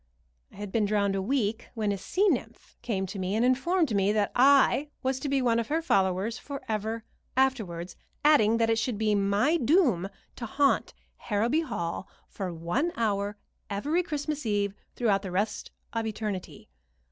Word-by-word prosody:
I -, -, -18 dB
had 205 Hz, 0 st, -6 dB
been 220 Hz, -1 st, +2 dB
drowned 200 Hz, -1 st, +1 dB
a 195 Hz, -, 0 dB
week 225 Hz, 0 st, -1 dB
when 215 Hz, -2 st, 0 dB
a 200 Hz, -, -1 dB
sea 385 Hz, -, +1 dB
nymph 235 Hz, -, -2 dB
came 210 Hz, -6 st, -1 dB
to 195 Hz, +1 st, -6 dB
me 185 Hz, +2 st, -1 dB
and 230 Hz, +2 st, +2 dB
informed 290 Hz, -, +2 dB
me 200 Hz, +1 st, +3 dB
that 210 Hz, -1 st, +1 dB
I 275 Hz, +2 st, +5 dB
was 260 Hz, 0 st, 0 dB
to 285 Hz, -, -3 dB
be 270 Hz, -1 st, +1 dB
one 235 Hz, -2 st, +3 dB
of 230 Hz, -, -2 dB
her 315 Hz, +2 st, +1 dB
followers 195 Hz, -, +1 dB
forever 225 Hz, -5 st, -4 dB, 0.3 s
afterwards, 200 Hz, -10 st, 0 dB, 0.3 s
adding 230 Hz, -7 st, +5 dB
that 225 Hz, 0 st, +2 dB
it 225 Hz, -, +2 dB
should 225 Hz, 0 st, -1 dB
be 215 Hz, 0 st, +1 dB
my 205 Hz, +10 st, +2 dB
doom 255 Hz, -, +3 dB, 0.3 s
to 235 Hz, -, -5 dB
haunt 280 Hz, +5 st, +1 dB, 0.2 s
Harrowby 235 Hz, +8 st, 0 dB
Hall 195 Hz, -, -4 dB, 0.2 s
for 190 Hz, -3 st, -5 dB
one 175 Hz, -, -1 dB
hour 205 Hz, -2 st, -1 dB, 0.3 s
every 290 Hz, -, 0 dB
Christmas 300 Hz, -3 st, -3 dB
Eve 205 Hz, -3 st, 0 dB, 0.2 s
throughout 205 Hz, -5 st, +2 dB
the 195 Hz, -, -6 dB
rest 205 Hz, +4 st, -2 dB, 0.2 s
of 225 Hz, -1 st, -1 dB
eternity. 200 Hz, -, -5 dB
220 Hz, 170 wpm, -28 LUFS, 200-265 Hz, 0.3 s, I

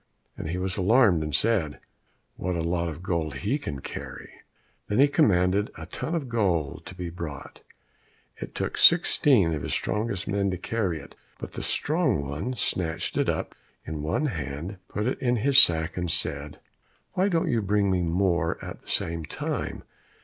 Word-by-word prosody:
and -, -, -6 dB
he 90 Hz, -, -2 dB
was 95 Hz, +1 st, -2 dB
alarmed 100 Hz, -3 st, +4 dB
and 75 Hz, -2 st, -2 dB
said, 85 Hz, -, +1 dB, 0.6 s
"What 90 Hz, 0 st, -2 dB
a 85 Hz, -, -1 dB
lot 85 Hz, 0 st, -1 dB
of 85 Hz, +2 st, -8 dB
gold 80 Hz, -5 st, -2 dB
he 65 Hz, -, -1 dB
can 70 Hz, -1 st, -5 dB
carry -, -, -8 dB
away!" -, -, -20 dB, 0.5 s
Then 105 Hz, -, -1 dB
he 140 Hz, +2 st, +7 dB
commanded 100 Hz, -, +2 dB
a -, -, -7 dB
ton 165 Hz, -, -4 dB
of 150 Hz, -5 st, -2 dB
gold 95 Hz, -, -1 dB
to 95 Hz, -, -9 dB
be 90 Hz, -2 st, -5 dB
brought; 85 Hz, -5 st, -8 dB, 0.8 s
it -, -, -8 dB
took -, -, -3 dB
sixteen 140 Hz, -, +5 dB
of 75 Hz, -, -3 dB
his -, -, -3 dB
strongest 105 Hz, -3 st, -2 dB
men 100 Hz, -1 st, 0 dB
to 90 Hz, -, -2 dB
carry 95 Hz, -4 st, -2 dB
it, 70 Hz, -, -13 dB, 0.2 s
but -, -, -8 dB
the -, -, -5 dB
strong 145 Hz, -, 0 dB
one 80 Hz, -, -3 dB
snatched 85 Hz, -7 st, -1 dB
it -, -, +1 dB
up -, -, -2 dB, 0.3 s
in 80 Hz, -1 st, -5 dB
one 80 Hz, -, 0 dB
hand, 80 Hz, -, -4 dB
put 105 Hz, +2 st, -3 dB
it 130 Hz, -, -1 dB
in 125 Hz, -1 st, +1 dB
his 135 Hz, +4 st, +7 dB
sack, 80 Hz, +1 st, +4 dB
and 90 Hz, -1 st, -2 dB
said, 75 Hz, -4 st, -1 dB, 0.5 s
"Why 190 Hz, +2 st, +2 dB
don't 165 Hz, -3 st, +1 dB
you 115 Hz, -2 st, +1 dB
bring 100 Hz, -4 st, +1 dB
more 85 Hz, -2 st, +1 dB
at -, -, -8 dB
the -, -, -15 dB
same 85 Hz, 0 st, -1 dB
time? -, -, -4 dB
90 Hz, 180 wpm, -26 LUFS, 80-115 Hz, 0.8 s, he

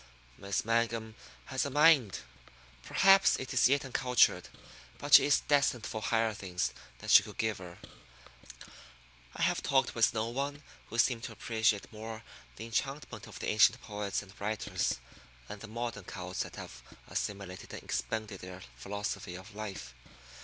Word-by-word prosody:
Miss 100 Hz, +6 st, -2 dB
Mangum 115 Hz, -1 st, 0 dB, 0.3 s
has 130 Hz, -1 st, -1 dB
a 140 Hz, -, -2 dB
mind. 145 Hz, -, +4 dB, 0.6 s
Perhaps 195 Hz, -, +5 dB
it 130 Hz, +1 st, -5 dB
is 125 Hz, -1 st, +5 dB
yet 140 Hz, +1 st, +2 dB
uncultured, 125 Hz, -2 st, +2 dB, 0.5 s
but -, -, -4 dB
she -, -, +10 dB
is 145 Hz, -, +4 dB
destined 140 Hz, -5 st, +2 dB
for 110 Hz, -3 st, -4 dB
higher 110 Hz, 0 st, +1 dB
things 90 Hz, -3 st, -3 dB, 0.2 s
than -, -, -9 dB
you -, -, +10 dB
could -, -, -11 dB
give 110 Hz, -3 st, -1 dB
her. 90 Hz, -1 st, -10 dB, 1.6 s
I -, -, -2 dB
have -, -, +2 dB
talked 135 Hz, -2 st, +2 dB
with 115 Hz, -2 st, +4 dB
no 110 Hz, 0 st, -1 dB
one 140 Hz, +4 st, -3 dB, 0.2 s
who 115 Hz, -, -7 dB
seemed 115 Hz, 0 st, +3 dB
to 120 Hz, -, -6 dB
appreciate 110 Hz, -2 st, 0 dB
more 110 Hz, 0 st, -7 dB, 0.3 s
the 110 Hz, -, -7 dB
enchantment 135 Hz, +5 st, -3 dB
of -, -, -10 dB
the -, -, -3 dB
ancient 110 Hz, +3 st, +5 dB
poets 105 Hz, -1 st, -3 dB
and 95 Hz, -1 st, -15 dB
writers 110 Hz, +1 st, -1 dB, 0.5 s
and 105 Hz, -, -8 dB
the 115 Hz, -, -8 dB
modern 115 Hz, -3 st, -5 dB
cults 90 Hz, -1 st, -6 dB
that -, -, -6 dB
have -, -, -9 dB, 0.3 s
assimilated 100 Hz, -3 st, -5 dB
and -, -, -8 dB
expended 110 Hz, -3 st, -3 dB
their 90 Hz, 0 st, -9 dB
philosophy 100 Hz, +3 st, -4 dB
of 95 Hz, +4 st, -11 dB
life. 100 Hz, -12 st, -7 dB
110 Hz, 160 wpm, -31 LUFS, 100-125 Hz, 1.6 s, she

